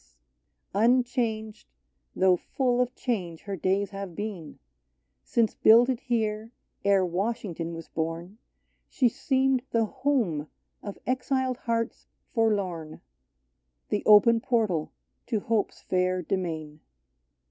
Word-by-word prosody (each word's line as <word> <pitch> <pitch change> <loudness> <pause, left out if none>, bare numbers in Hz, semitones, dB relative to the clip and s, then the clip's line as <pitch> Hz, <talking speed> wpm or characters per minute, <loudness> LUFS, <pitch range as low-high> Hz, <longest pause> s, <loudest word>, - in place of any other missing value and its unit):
DAVIDS 205 +3 +3
Unchanged, 225 -3 -2 0.5
though 185 -1 +4
full 250 +6 0
of 250 0 -1
change 180 -10 -3
her 200 -1 -5
days 190 +3 0
have 195 -3 -6
been, 200 -7 -6 0.7
Since 230 -2 +1
builded 240 +2 +5
here, 220 -3 -2 0.3
ere 195 -2 +4
Washington 180 -3 -3
was 165 - -8
born, 165 +5 -4 0.5
She 255 - +2
seemed 265 +2 +1
the 230 -1 +2
home 235 - 0 0.3
of 205 - -7
exiled 260 0 0
hearts 230 -2 -2 0.3
for 225 -2 +3
lorn 175 -6 -3 0.4
— 60 0 -50
The 205 - +1
open 215 +2 +7
portal 220 - 0 0.4
to 225 -4 0
hope's 225 -3 -1
fair 185 0 0
demesne. 160 -4 -3
210 Hz, 115 wpm, -27 LUFS, 175-235 Hz, 0.7 s, open